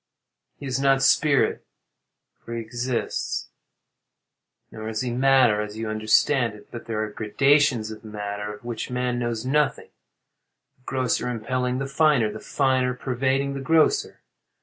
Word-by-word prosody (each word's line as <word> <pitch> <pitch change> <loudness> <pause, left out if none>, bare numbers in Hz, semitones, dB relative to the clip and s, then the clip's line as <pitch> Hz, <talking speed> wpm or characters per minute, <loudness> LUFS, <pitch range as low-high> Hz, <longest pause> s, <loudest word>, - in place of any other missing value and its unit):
_] - - -60 0.5
He 145 - -9
is 130 0 -1
not 135 -1 +3
spirit, 140 +2 +3 0.8
for 115 - -8
he - - -2
exists. 120 +2 -3 1.2
Nor 110 0 -6
is 110 -1 -3
he 125 -1 -2
matter, 125 -4 +4
as 105 0 -6
you 110 -1 -3
understand 110 +2 +2
it. 105 - -17
But 120 - -8
there 110 -1 -1
are 105 - -5
gradations 125 +1 +2
of 110 - -10
matter 105 -1 -5
of 105 +3 -12
which 120 -2 -4
man 125 -1 -1
knows 120 -1 -3
nothing; 145 +1 0 0.9
the - - -34
grosser 130 -1 -1
impelling 125 +2 -2
the 135 - -2
finer, 135 -5 +2
the - - -8
finer 130 -2 0
pervading 135 +2 -1
the 135 - -5
grosser. 165 - +2
125 Hz, 150 wpm, -24 LUFS, 110-135 Hz, 1.2 s, matter